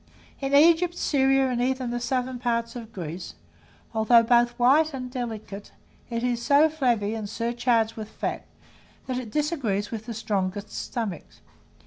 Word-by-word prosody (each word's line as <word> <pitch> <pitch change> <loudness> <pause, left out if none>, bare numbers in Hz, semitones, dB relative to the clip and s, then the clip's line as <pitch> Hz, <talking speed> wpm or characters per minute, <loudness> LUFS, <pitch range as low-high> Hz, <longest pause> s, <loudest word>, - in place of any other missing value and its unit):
In 275 0 0
Egypt, 335 +3 +5
Syria, 270 -3 +3
and 245 -1 -1
even 255 -1 -1
the 240 - -2
southern 255 0 -2
parts 235 -1 -1
of 230 -2 -8
Greece, 175 -1 -7 0.6
although 225 +1 +5
both 240 +1 +3
white 280 +5 +4
and 255 -1 -6
delicate, 220 -5 -6 0.4
it 230 0 -3
is 245 -1 0
so 290 +5 +5
flabby 240 -9 0
and 215 -2 -5
surcharged 230 0 0
with 215 -1 -7
fat, - - -4 0.6
that 255 -1 -2
it 240 -3 -7
disagrees 260 - -1
with 225 0 -6
the 230 - -5
strongest 200 -2 -2
stomachs. 215 - -5
240 Hz, 150 wpm, -25 LUFS, 220-265 Hz, 0.6 s, Egypt